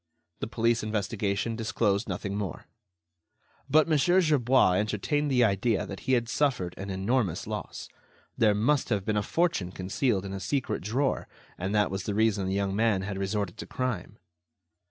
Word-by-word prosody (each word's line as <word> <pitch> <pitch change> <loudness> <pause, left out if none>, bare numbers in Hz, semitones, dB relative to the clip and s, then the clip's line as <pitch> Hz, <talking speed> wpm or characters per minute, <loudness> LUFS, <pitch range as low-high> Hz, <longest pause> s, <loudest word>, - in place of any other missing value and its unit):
The - - -3
police 115 +1 +1
investigation 105 0 -1
disclosed 110 -2 0
nothing 100 +2 -3
more. 100 -5 -4 1.0
But 155 +3 +5
Mon. 155 -3 +3
Gerbois 145 - +4
entertained 110 +8 0
the 125 -2 +4
idea 105 0 +1
that 100 - -7
he - - +4
had 120 -2 +2
suffered 115 -10 0
an 100 +1 -6
enormous 100 +1 0
loss. - - -6 0.5
There 105 -3 +3
must 130 +7 +1
have 100 -4 0
been 110 - 0
a 105 - +2
fortune 165 - 0
concealed 95 +2 -1
in 95 - -5
a 95 - -4
secret 130 +8 -2
drawer, 130 +8 -1 0.3
and 95 +4 -3
that 105 -2 +2
was 95 -1 -3
the 105 - -2
reason 105 -3 +2
the 95 - -1
young 100 -1 0
man 110 -3 +2
had 100 -1 -4
resorted 100 -2 -2
to - - -7
crime. 110 -5 -3
105 Hz, 170 wpm, -28 LUFS, 100-125 Hz, 1.0 s, But